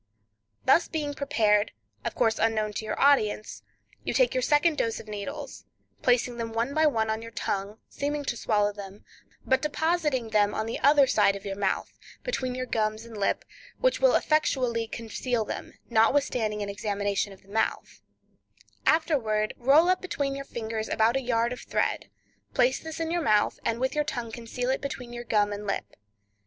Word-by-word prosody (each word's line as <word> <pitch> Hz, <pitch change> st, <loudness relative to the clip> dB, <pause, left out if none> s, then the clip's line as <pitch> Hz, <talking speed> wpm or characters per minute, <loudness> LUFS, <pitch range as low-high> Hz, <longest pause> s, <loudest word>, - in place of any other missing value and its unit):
Thus 340 Hz, -, +5 dB
being 295 Hz, -3 st, -3 dB
prepared, 215 Hz, -7 st, +2 dB, 0.3 s
of -, -, -3 dB
course 225 Hz, -2 st, +2 dB
unknown 215 Hz, -1 st, +1 dB
to 220 Hz, -, -4 dB
your -, -, -3 dB
audience, 220 Hz, -7 st, +2 dB, 0.4 s
you -, -, -2 dB
take -, -, +4 dB
your 255 Hz, -, +1 dB
second 295 Hz, +4 st, +3 dB
dose 230 Hz, -1 st, 0 dB
of -, -, -11 dB
needles, 215 Hz, +8 st, -6 dB, 0.4 s
placing 245 Hz, -1 st, +2 dB
them 230 Hz, -1 st, -4 dB
one 230 Hz, +4 st, -1 dB
by 310 Hz, +1 st, +4 dB
one 220 Hz, -6 st, +1 dB
on 220 Hz, 0 st, -2 dB
your 230 Hz, -, -8 dB
tongue, 200 Hz, -2 st, -3 dB
seeming 290 Hz, 0 st, -3 dB
to 240 Hz, -, -1 dB
swallow 210 Hz, -2 st, +1 dB
them, 200 Hz, 0 st, -10 dB, 0.4 s
but 265 Hz, 0 st, +2 dB
depositing 300 Hz, -6 st, 0 dB
them 210 Hz, -1 st, +3 dB
on 220 Hz, -, -1 dB
the 225 Hz, -, -4 dB
other 285 Hz, 0 st, +6 dB
side 205 Hz, -5 st, +3 dB
of 200 Hz, +1 st, -9 dB
your 195 Hz, -1 st, -3 dB
mouth, 195 Hz, -1 st, -2 dB, 0.2 s
between 255 Hz, -, -2 dB
your 255 Hz, 0 st, -3 dB
gums 215 Hz, -1 st, -1 dB
and 230 Hz, -1 st, -11 dB
lip, 200 Hz, -1 st, 0 dB, 0.3 s
which -, -, +2 dB
will -, -, +5 dB
effectually 250 Hz, -7 st, +1 dB
conceal 230 Hz, +1 st, -2 dB
them, -, -, -6 dB
notwithstanding 225 Hz, -2 st, +2 dB
an 200 Hz, -, -4 dB
examination 205 Hz, 0 st, -1 dB
of 195 Hz, -, -15 dB
the -, -, -25 dB
mouth; 220 Hz, +2 st, -2 dB, 0.9 s
afterward 230 Hz, -10 st, +2 dB
roll 280 Hz, +7 st, +5 dB
up 370 Hz, 0 st, +2 dB
between 280 Hz, -7 st, -2 dB
your 275 Hz, 0 st, -6 dB
fingers 220 Hz, -3 st, -4 dB
about 225 Hz, +3 st, +3 dB
a 270 Hz, -, +1 dB
yard 235 Hz, -1 st, +1 dB
of 250 Hz, -, -8 dB
thread; -, -, -1 dB, 0.5 s
place 255 Hz, +1 st, +3 dB
this 320 Hz, 0 st, -7 dB
in 325 Hz, 0 st, -2 dB
your 345 Hz, 0 st, 0 dB
mouth, 215 Hz, -8 st, +2 dB
and 230 Hz, 0 st, -1 dB
with 260 Hz, +1 st, 0 dB
your 300 Hz, -1 st, +1 dB
tongue 240 Hz, -5 st, -4 dB
conceal 245 Hz, +2 st, -3 dB
it 265 Hz, -, -1 dB
between 250 Hz, -3 st, -6 dB
your 240 Hz, 0 st, -6 dB
gum 205 Hz, -2 st, +2 dB
and 205 Hz, 0 st, -6 dB
lip. 195 Hz, -, -3 dB
235 Hz, 185 wpm, -27 LUFS, 215-280 Hz, 0.9 s, other